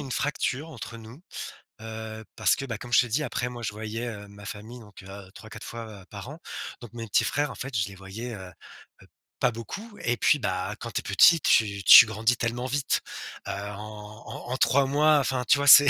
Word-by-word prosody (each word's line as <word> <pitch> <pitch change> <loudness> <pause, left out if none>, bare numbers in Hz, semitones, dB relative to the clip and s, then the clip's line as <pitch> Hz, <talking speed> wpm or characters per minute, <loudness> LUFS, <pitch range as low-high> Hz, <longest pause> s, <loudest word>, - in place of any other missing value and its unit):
une 140 -2 -7
fracture 140 +2 -1
entre 115 -5 -8
nous, 115 +7 -12 0.6
heu, 110 0 -7
parce - - +3
que, 135 - -4
bah 115 -5 -4
comme 120 +2 -10
je - - +6
t'ai 125 - +3
dit 130 +7 0
après 125 -4 -2
moi 120 -1 -7
je 105 - -2
voyais, 110 +2 -5
heu, 105 -3 -7
ma 100 0 -13
famille 110 +4 -8
donc, 105 -2 -14
heu, 95 -1 -11
3-4 110 0 -11
fois 110 -4 -8
par 100 +2 -8
an. 150 +3 -9 0.4
Donc, 120 - -10
mes 115 -1 -6
petits 105 - +3
frères 145 0 0
en - - -9
fait, 135 -1 -6
je 95 -4 +1
les 100 - -10
voyais, 100 +6 -7
heu, 95 -4 -8 0.5
heu, - - -17 0.3
pas - - +3
beaucoup 200 - -8
et 120 - +1
puis, 150 - +4
bah, 95 -3 -2
quand 120 - -6
tu - - -1
es - - -25
petit, 160 +11 +6
tu 100 -6 +3
tu 115 - +11
grandis 110 +3 +1
tellement 120 +2 -2
vite, 140 +1 0 0.5
heu, - - -2
en 105 +1 -8
en - - -8
en 130 - -1
3 135 +2 +4
mois, 150 +3 +4
enfin 130 -2 0
tu - - +6
vois? 140 - -1
C'est 145 0 +10
115 Hz, 225 wpm, -27 LUFS, 105-130 Hz, 0.6 s, tu